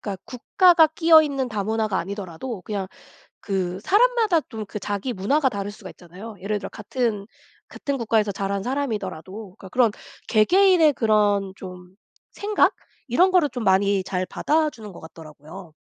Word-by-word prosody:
그러니까 195 -3 -6
국가가 335 +6 +4
끼어있는 315 -5 +3
다문화가 215 -1 -1
아니더라도 195 +3 -6
그냥 200 -3 -4 0.5
그 185 -2 -3
사람마다 440 - +3
또 220 -3 -6
그 210 - -6
자기 205 +5 -3
문화가 265 +9 +1
다를 200 -3 -5
수가 205 -2 -11
있잖아요. 185 +6 -12
예를 205 +2 -2
들어 - - -7
같은, 215 -2 -3 0.4
같은 280 -2 -4
국가에서 215 -3 +1
자란 195 0 -3
사람이더라도 205 - -5
그러니까 190 - -12
그런 245 +1 +2 0.4
개개인의 340 - +4
그런 205 -4 +1
좀 180 -1 -11 0.4
생각? 415 +1 +1 0.3
이런 355 +11 +3
거를 350 -6 +3
좀 245 -2 -5
많이 195 0 +2
잘 185 -1 -3
받아 310 0 0
주는 215 -6 -11
것 - - -12
같더라고요. 160 +2 -12
210 Hz, 360 characters per minute, -23 LUFS, 190-275 Hz, 0.5 s, 국가가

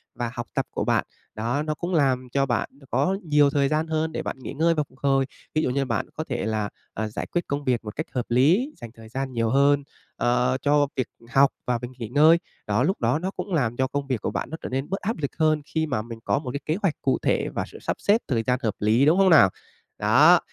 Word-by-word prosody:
và 120 -1 -3
học 120 -1 -5
tập - - 0
của - - -2
bạn - - +2 0.3
đó, 120 +7 -1
nó 155 0 -1
cũng 175 +4 -4
làm 130 -5 +2
cho 140 +1 +2
bạn 120 -3 -1 0.2
có 190 +1 +1
nhiều 150 -2 +4
thời 140 -1 +2
gian 155 +3 0
hơn 160 0 -1
để - - -4
bạn 130 - -5
nghỉ 130 - -7
ngơi 165 +3 +2
và 150 - 0
phục 130 - -23
hồi. 135 -1 +2 0.3
Thí 155 - +3
dụ 155 - 0
như 135 +2 0
bạn 115 -3 -1
có 155 - -3
thể - - -2
là, 110 -2 -1 0.2
à, 110 +1 -2
giải 105 - -5
quyết 175 - -1
công 140 +1 -2
việc 125 -3 0
một 105 -1 -7
cách 155 - -3
hợp 125 -2 -2
lý, 165 - +3
dành 120 - -9
thời 110 -1 -14
gian 135 +1 -4
nhiều 115 -1 0
hơn, 140 +3 +3 0.3
ờ, 125 +1 +1
cho 145 0 +3
việc 130 -3 -1 0.2
học 140 0 +5 0.2
và 125 - +1
việc 120 +1 -6
nghỉ 115 - -4
ngơi. 155 +7 +6 0.3
Đó, 105 +4 +2
lúc 185 +1 0
đó 120 +6 +2
nó 185 +3 -3
cũng 195 - -5
làm 120 -7 0
cho 130 0 +2
công 140 +1 -3
việc 130 -5 -1
của - - -2
bạn - - -3
nó 160 - -5
trở - - -5
nên 135 +2 -3
bớt 195 - -2
áp 215 0 -2
lực 140 -3 -3
hơn 155 -1 +2
khi 160 0 -1
mà 125 -8 -1
mình 115 0 -9
có - - +1
một 130 -4 -5
cái 140 - -3
kế 155 +3 0
hoạch 190 -6 +2
cụ 135 - +2
thể - - +1
và - - -3
sự - - -12
sắp - - -2
xếp 215 +4 +3
thời 115 -6 0
gian 125 +2 +1
hợp 110 -3 +1
lý, 110 +6 +3
đúng 160 +4 +4
hông 195 -1 +5
nào? 160 - +7 0.5
Đó, - - +6
135 Hz, 270 wpm, -25 LUFS, 120-155 Hz, 0.5 s, nào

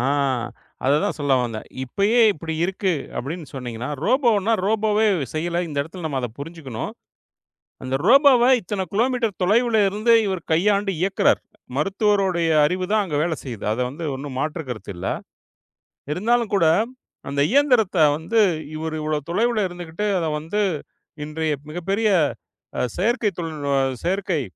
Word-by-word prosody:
ஆ - - 0 0.8
அத 140 - +4
தான் - - -1
சொல்ல 145 -1 0
வந்தேன். 115 -2 -5 0.2
இப்பயே 200 - +2
இப்படி 160 +1 -5
இருக்கு 190 0 0 0.3
அப்படின்னு 155 +4 -5
சொன்னீங்கன்னா 125 -1 -5 0.2
ரோபோனா 230 -4 +3
ரோபோவே 215 0 +2 0.3
செய்யல. 170 +2 -1
இந்த 145 -2 -4
இடத்துல 165 +3 -9
நம்ம 140 -3 -2
அத 125 - -3
புரிஞ்சுக்கணும். 140 -6 -6 0.9
அந்த 130 +1 -3
ரோபோவ 270 -1 +6 0.2
இத்தனை 190 0 -3
கிலோமீட்டர் 235 -1 0
தொலைவுல 220 +3 +3
இருந்து 215 +4 +2
இவர் 190 -4 -2
கையாண்டு 200 +3 +2
இயக்குறார். 190 +2 +2 0.4
மருத்துவரோட 195 +3 +1 0.3
அறிவுதான் 185 +6 +1
அங்க 150 -5 -3
வேல 165 -1 0
செய்யுது. 120 -6 -7
அது 120 - -2
வந்து 150 +6 -7
ஒண்ணும் 135 -1 -6
மாற்று 155 +4 -2
கருத்து 110 -3 -6
இல்ல. 95 +2 -5 1.1
இருந்தாலும் 230 +5 +1
கூட 170 - +3 0.6
அந்த 140 0 0
இயந்திரத்த 250 -9 +3 0.2
வந்து 220 +8 0 0.4
இவரு 160 0 -4
இவ்ளோ 155 0 -1
தொலைவுல 220 +4 +1
இருந்துகிட்டு 175 +2 -5
அத 170 - -1
வந்து 175 +7 -2 0.6
இன்றைய 155 0 -2 0.2
மிகப்பெரிய 195 +7 0 0.7
அ - - +1 0.2
செயற்கை 225 +2 +1
தொழில் 155 -4 -4
அ - - +3 0.2
செயற்கை 185 -4 0
180 Hz, 135 wpm, -22 LUFS, 155-210 Hz, 1.1 s, ரோபோவ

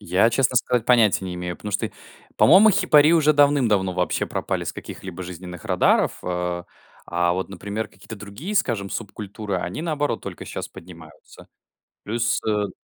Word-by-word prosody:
Я, 100 +4 +2
честно 130 +1 +1
сказать, 120 -1 +1
понятия 115 -6 +4
не 90 -1 -5
имею, 90 0 -5
потому 105 - -7
что, 100 - -1 0.5
по-моему, 195 +8 +7
хипари 150 -4 +5
уже 155 -2 +4
давным-давно 130 -10 +3
вообще 90 0 -1
пропали - - -3
с - - -3
каких-либо 95 -1 -8
жизненных 90 -1 -9
радаров, - - +2
а 90 -1 -2 0.4
а 85 0 0
вот, 95 +1 -3
например, 100 +2 -5
какие-то 100 +2 -11
другие, 105 - -7
скажем, 115 - 0
субкультуры, 105 -1 -5
они, 90 - -4
наоборот, 150 -3 -1
только - - -7
щас - - -6
поднимаются. 85 -3 -14 0.6
Плюс, 115 +3 0
э 105 -2 0
105 Hz, 155 wpm, -23 LUFS, 90-125 Hz, 0.6 s, по-моему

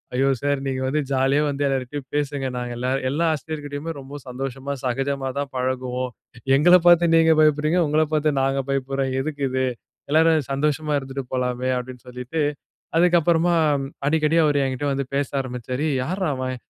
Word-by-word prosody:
"ஐயோ 135 +2 +2
சார்! 145 -1 0
நீங்க 130 -1 -2
வந்து 150 +3 0
ஜாலியா 135 +2 +2
வந்து 145 0 -2
எல்லார்கிட்டயும் 135 0 -3
பேசுங்க. 145 -2 -1
நாங்க 125 -1 -4
எல்லாரும், 130 +2 -1
எல்லா 155 +5 0
ஆசிரியர்கிட்டேயுமே 150 +1 -5
ரொம்ப 140 +2 -9
சந்தோஷமா 135 +2 -5
சகஜமா 135 +2 -1
தான் 140 -1 -3
பழகுவோம். 130 0 -2 0.4
எங்கள 175 +6 +6
பார்த்து 175 0 +7
நீங்க 165 0 +5
பயப்படுறீங்க, 155 +3 +3
உங்கள 150 +1 +2
பார்த்து 155 0 +2
நாங்க 135 0 +1
பயப்படுறோம். 135 0 -1
எதுக்கு 145 0 -5
இது? 130 0 0 0.5
எல்லாரும் 160 -1 +4
சந்தோஷமா 150 +2 0
இருந்துட்டு 135 0 -6
போலாமே" 125 0 -1
அப்படின்னு 125 0 -7
சொல்லிட்டு. 125 +5 -4 0.6
அதுக்கப்புறமா 170 0 +3 0.5
அடிக்கடி 155 +1 +2
அவரு 145 -1 +2
என்கிட்ட 135 +2 -2
வந்து 135 -1 -2
பேச 140 0 +1
ஆரம்பிச்சாரு. 125 +3 -4
"ஏ - - 0
யார்ரா 185 +3 -1
அவன்? 130 0 -3
140 Hz, 155 wpm, -23 LUFS, 130-150 Hz, 0.6 s, பார்த்து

